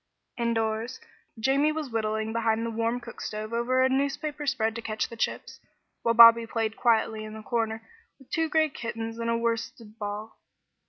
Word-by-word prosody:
Indoors, 230 Hz, 0 st, -1 dB, 0.4 s
Jamie 270 Hz, +6 st, +2 dB
was 305 Hz, -4 st, -4 dB
whittling 220 Hz, 0 st, -1 dB
behind 225 Hz, 0 st, +1 dB
the 230 Hz, -, -3 dB
warm 230 Hz, +2 st, -1 dB
cookstove 215 Hz, -2 st, -6 dB
over 250 Hz, +2 st, +2 dB
a -, -, +5 dB
newspaper 290 Hz, +2 st, -1 dB
spread 225 Hz, -5 st, +1 dB
to 230 Hz, -, -5 dB
catch 215 Hz, -1 st, -2 dB
the 230 Hz, -, -9 dB
chips, 225 Hz, -, -3 dB, 0.4 s
while 230 Hz, 0 st, +1 dB
Bobby 230 Hz, 0 st, +9 dB
played 225 Hz, -1 st, -2 dB
quietly 220 Hz, -2 st, +1 dB
in 215 Hz, 0 st, -8 dB
a 220 Hz, -, -9 dB
corner 225 Hz, -1 st, -2 dB, 0.3 s
with 270 Hz, -, -21 dB
two 325 Hz, -1 st, 0 dB
gray 315 Hz, 0 st, +3 dB
kittens 230 Hz, -3 st, -5 dB
and 230 Hz, 0 st, -2 dB
a 230 Hz, -, +2 dB
worsted 230 Hz, -1 st, -3 dB
ball. 210 Hz, +1 st, -6 dB
230 Hz, 170 wpm, -27 LUFS, 220-245 Hz, 0.4 s, Bobby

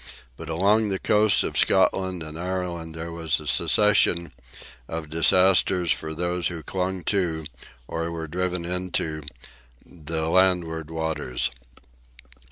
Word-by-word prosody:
But 80 Hz, +4 st, -9 dB
along 100 Hz, +6 st, +2 dB
the 95 Hz, -, -1 dB
coasts 105 Hz, +1 st, +3 dB
of -, -, -4 dB
Scotland 95 Hz, -3 st, +2 dB
and 80 Hz, 0 st, -7 dB
Ireland 85 Hz, -2 st, -4 dB
there 80 Hz, +1 st, -6 dB
was 80 Hz, -2 st, -1 dB
a 75 Hz, -, -11 dB
succession 85 Hz, +1 st, +3 dB, 0.6 s
of 80 Hz, -2 st, -6 dB
disasters 90 Hz, +1 st, +4 dB
for 80 Hz, 0 st, -2 dB
those 90 Hz, +1 st, -1 dB
who 85 Hz, -2 st, -6 dB
clung 95 Hz, -1 st, -3 dB
to, 85 Hz, -5 st, -1 dB, 0.4 s
or 85 Hz, 0 st, -3 dB
were 80 Hz, -1 st, -5 dB
driven 90 Hz, +1 st, -2 dB
into, 90 Hz, -3 st, -2 dB, 0.6 s
the 80 Hz, -1 st, -4 dB
landward 85 Hz, -3 st, +2 dB
waters. 80 Hz, -6 st, -2 dB
85 Hz, 125 wpm, -24 LUFS, 80-90 Hz, 0.6 s, disasters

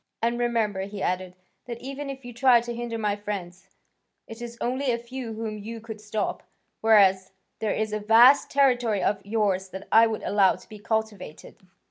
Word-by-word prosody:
"And 235 Hz, +1 st, -1 dB
remember," 225 Hz, -5 st, 0 dB
he 200 Hz, -1 st, -6 dB
added, 185 Hz, 0 st, -2 dB, 0.3 s
"that 235 Hz, -1 st, -7 dB
even 275 Hz, +2 st, -6 dB
if 270 Hz, -2 st, -8 dB
you 245 Hz, -, -8 dB
try 245 Hz, 0 st, +5 dB
to 240 Hz, +1 st, -5 dB
hinder 235 Hz, -1 st, -4 dB
my 210 Hz, -2 st, 0 dB
friends, 190 Hz, -3 st, -7 dB, 0.6 s
it 225 Hz, +1 st, -11 dB
is 235 Hz, 0 st, -7 dB
only 255 Hz, +2 st, -1 dB
a 235 Hz, -, 0 dB
few 235 Hz, 0 st, -7 dB
whom 215 Hz, -1 st, -5 dB
you 225 Hz, +3 st, -7 dB
could 220 Hz, -1 st, -9 dB
stop, 210 Hz, 0 st, -3 dB, 0.4 s
whereas 195 Hz, -4 st, +4 dB, 0.3 s
there 220 Hz, -, -1 dB
is 215 Hz, -1 st, -2 dB
a 215 Hz, -, -1 dB
vast 230 Hz, +6 st, +6 dB
territory 245 Hz, -7 st, +2 dB
of 205 Hz, -, 0 dB
yours 200 Hz, -3 st, -1 dB
that 190 Hz, +1 st, -9 dB
I 225 Hz, +1 st, +7 dB
could 220 Hz, -1 st, -4 dB
allow 200 Hz, -2 st, +3 dB
to -, -, -16 dB
be 215 Hz, -, -11 dB
cultivated. 215 Hz, -6 st, -4 dB
220 Hz, 185 wpm, -25 LUFS, 205-240 Hz, 0.6 s, I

